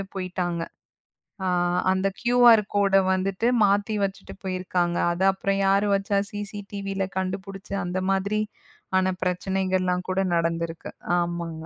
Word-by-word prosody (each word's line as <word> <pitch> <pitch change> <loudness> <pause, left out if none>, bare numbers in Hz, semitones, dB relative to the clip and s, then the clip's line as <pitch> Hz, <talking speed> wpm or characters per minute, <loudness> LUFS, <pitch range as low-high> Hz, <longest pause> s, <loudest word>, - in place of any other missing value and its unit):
போயிட்டாங்க. 180 -2 -2 0.9
அ - - 0 0.4
அந்தக் 190 +1 0
QR 240 -2 +6 0.2
கோட 200 -1 +3 0.2
வந்துட்டு 190 +4 0 0.2
மாத்தி 205 +2 +1
வச்சிட்டு 195 - -7
போயிருக்காங்க. 180 -2 -1 0.2
அத 175 - -6
அப்புறம் 195 +1 -1
யாரு 200 +1 +3
வச்சா 200 0 0
CCTVல 200 -2 -4
கண்டுபுடிச்சு, 195 +1 -5
அந்த 185 +1 -2
மாதிரி 200 +2 0 0.6
ஆன 185 0 +2
பிரச்சனைகள்லாம் 185 0 0
கூட 185 +1 0 0.2
நடந்திருக்கு. 165 0 -2 0.3
ஆமாங்க. 170 -2 -3
190 Hz, 115 wpm, -25 LUFS, 180-200 Hz, 0.9 s, QR